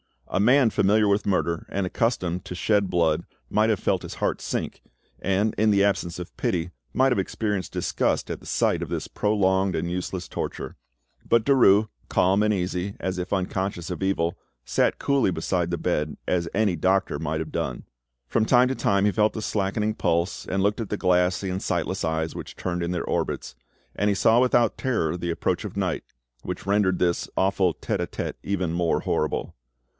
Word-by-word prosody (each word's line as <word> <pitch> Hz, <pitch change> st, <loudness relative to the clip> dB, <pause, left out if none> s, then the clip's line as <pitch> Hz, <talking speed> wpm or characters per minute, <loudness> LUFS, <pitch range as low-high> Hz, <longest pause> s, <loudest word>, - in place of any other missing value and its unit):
A -, -, 0 dB
man 125 Hz, +4 st, +5 dB
familiar 105 Hz, +1 st, +3 dB
with 100 Hz, +1 st, +1 dB
murder 85 Hz, -4 st, 0 dB
and 100 Hz, 0 st, -1 dB
accustomed 90 Hz, -4 st, -1 dB
to 90 Hz, -, -6 dB
shed 100 Hz, +1 st, +1 dB
blood 85 Hz, -2 st, +1 dB, 0.3 s
might 110 Hz, +1 st, +3 dB
have 110 Hz, -4 st, +1 dB
felt -, -, +1 dB
his -, -, -7 dB
heart -, -, -1 dB
sink, -, -, -3 dB, 0.4 s
and, 100 Hz, +3 st, +1 dB
in 110 Hz, 0 st, +4 dB
the 100 Hz, -1 st, +4 dB
absence 90 Hz, -4 st, 0 dB
of 90 Hz, 0 st, -8 dB
pity, 85 Hz, -1 st, -1 dB, 0.2 s
might 130 Hz, +1 st, +3 dB
have 125 Hz, -, +2 dB
experienced 100 Hz, 0 st, -2 dB
disgust -, -, 0 dB
at -, -, -4 dB
the -, -, -17 dB
sight -, -, +1 dB
of -, -, -3 dB
this -, -, -3 dB
prolonged 95 Hz, -3 st, +1 dB
and 85 Hz, -, -2 dB
useless 90 Hz, 0 st, -3 dB
torture; -, -, -5 dB, 0.5 s
but 115 Hz, -1 st, +4 dB
Derues, 110 Hz, -6 st, +5 dB, 0.2 s
calm 95 Hz, +3 st, +3 dB
and 105 Hz, 0 st, +3 dB
easy, 90 Hz, +1 st, -2 dB
as 95 Hz, -1 st, -2 dB
if 90 Hz, +2 st, -3 dB
unconscious 95 Hz, -2 st, -2 dB
of 90 Hz, -, -5 dB
evil, 95 Hz, -3 st, 0 dB, 0.3 s
sat -, -, +1 dB
coolly 140 Hz, -8 st, +2 dB
beside 85 Hz, +1 st, -1 dB
the 85 Hz, -, -1 dB
bed, 75 Hz, -3 st, -1 dB
as 85 Hz, -2 st, +1 dB
any 100 Hz, -4 st, +1 dB
doctor 95 Hz, +4 st, +1 dB
might 80 Hz, 0 st, -2 dB
have 80 Hz, -1 st, -6 dB
done. 65 Hz, -, -3 dB, 0.4 s
From 110 Hz, -, +1 dB
time 125 Hz, +2 st, +5 dB
to 130 Hz, -, -1 dB
time 100 Hz, -4 st, +2 dB
he 105 Hz, -, +3 dB
felt 105 Hz, +1 st, +2 dB
the 110 Hz, -, -4 dB
slackening 105 Hz, +1 st, -1 dB
pulse, 85 Hz, 0 st, -1 dB
and 95 Hz, +1 st, 0 dB
looked 105 Hz, +3 st, +1 dB
at 110 Hz, -, -5 dB
the 105 Hz, -, -2 dB
glassy 90 Hz, +1 st, +2 dB
and 95 Hz, +1 st, -3 dB
sightless 90 Hz, +1 st, -1 dB
eyes 80 Hz, 0 st, -1 dB
which -, -, -8 dB
turned 90 Hz, -1 st, -3 dB
in 85 Hz, +1 st, -1 dB
their 90 Hz, -2 st, -1 dB
orbits, -, -, -2 dB, 0.4 s
and 105 Hz, +1 st, +1 dB
he 100 Hz, -, +2 dB
saw 115 Hz, +4 st, +4 dB
without 120 Hz, -2 st, +3 dB
terror 110 Hz, -, 0 dB
the 85 Hz, 0 st, -3 dB
approach 85 Hz, -, -1 dB
of -, -, -7 dB
night, -, -, -1 dB, 0.4 s
which -, -, -6 dB
rendered 100 Hz, -2 st, +2 dB
this 85 Hz, -1 st, 0 dB
awful 95 Hz, -2 st, +2 dB
'tete -, -, -3 dB
a -, -, -1 dB
tete' -, -, -5 dB
even 95 Hz, -4 st, -1 dB
more 85 Hz, 0 st, +1 dB
horrible. 75 Hz, -, -1 dB
95 Hz, 195 wpm, -25 LUFS, 85-105 Hz, 0.5 s, man